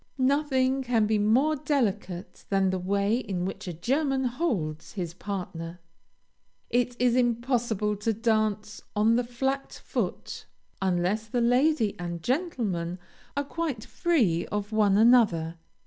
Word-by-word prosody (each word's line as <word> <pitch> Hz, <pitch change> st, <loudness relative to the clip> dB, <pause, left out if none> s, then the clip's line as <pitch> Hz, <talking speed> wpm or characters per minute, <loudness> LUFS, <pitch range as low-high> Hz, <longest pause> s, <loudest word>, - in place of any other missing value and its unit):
Nothing 265 Hz, -1 st, +2 dB
can 235 Hz, -4 st, +2 dB
be 215 Hz, 0 st, +1 dB
more 255 Hz, +9 st, +3 dB
delicate 215 Hz, -, -2 dB
than 195 Hz, -1 st, +2 dB
the 185 Hz, -, -1 dB
way 200 Hz, +4 st, +1 dB
in 190 Hz, -7 st, -3 dB
which 190 Hz, -, -5 dB
a 175 Hz, -, -3 dB
German 265 Hz, -, 0 dB
holds 230 Hz, -, -2 dB
his 175 Hz, -5 st, -4 dB
partner. 180 Hz, -3 st, -6 dB, 0.9 s
It 245 Hz, 0 st, +1 dB
is 245 Hz, -1 st, +3 dB
impossible 235 Hz, -3 st, +1 dB
to 210 Hz, +3 st, 0 dB
dance 215 Hz, -1 st, 0 dB
on 215 Hz, +2 st, +4 dB
the 245 Hz, -, +2 dB
flat 265 Hz, +3 st, -3 dB
foot -, -, -3 dB, 0.3 s
unless 190 Hz, +4 st, 0 dB
the 240 Hz, +3 st, -1 dB
lady 245 Hz, -2 st, +3 dB
and 170 Hz, -1 st, -5 dB
gentleman 225 Hz, -, -1 dB, 0.4 s
are 285 Hz, -, +2 dB
quite 280 Hz, -6 st, -3 dB
free 230 Hz, -, +1 dB
of 210 Hz, 0 st, -3 dB
one 210 Hz, -2 st, +3 dB
another. 205 Hz, -9 st, +4 dB
220 Hz, 130 wpm, -27 LUFS, 190-255 Hz, 0.9 s, on